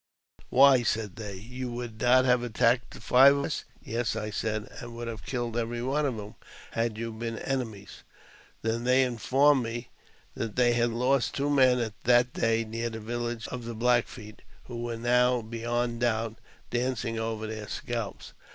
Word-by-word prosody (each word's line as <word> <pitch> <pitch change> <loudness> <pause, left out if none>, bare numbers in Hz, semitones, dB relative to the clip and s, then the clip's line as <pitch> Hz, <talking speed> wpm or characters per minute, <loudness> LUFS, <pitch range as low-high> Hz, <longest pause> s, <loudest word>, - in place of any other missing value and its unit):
" - - -66
Why," 135 -1 +6
said 105 -5 -1
they, 105 -3 -6
"you 125 +5 -6
would 120 -2 -6
not 130 +1 +5
have 125 -1 +4
attacked 120 +1 +1
five 135 +3 +6
of 140 - -1
us? - - -3 0.2
"Yes," 115 0 -2
I 105 0 -3
said, 110 0 -2
"and 120 -1 -8
would 120 0 -5
have 115 -2 -6
killed 120 -3 -2
every 120 0 -2
one 145 +3 +1
of 130 - -2
you,J 105 -1 -10 0.3
had 115 -1 -1
you 115 0 -4
been 115 +1 -5
enemies." 110 -9 -4 0.6
They 115 +1 0
then 120 - -5 0.2
informed 135 +4 +3
me 115 +1 -5 0.4
that 115 -2 -4
they 120 -1 +4
had 120 0 +2
lost 125 +1 +1
two 140 +1 0
men 130 -3 +5 0.3
that 120 0 +4
day^ 115 0 +1
near 115 +2 -3
the 110 -1 -6
village 120 +1 -4
of 125 -2 -6
the 115 0 -5
Black 120 +1 +3
Feet, 110 -2 -11 0.2
who 120 -1 -7
were 120 -1 -3
now, 125 +1 +3
beyond 120 +1 -2
doubt, 115 -2 0 0.3
dancing 120 -2 -1
over 110 -1 -3
their 110 -1 -6
scalps. 115 -4 -5
120 Hz, 180 wpm, -28 LUFS, 115-125 Hz, 0.6 s, Why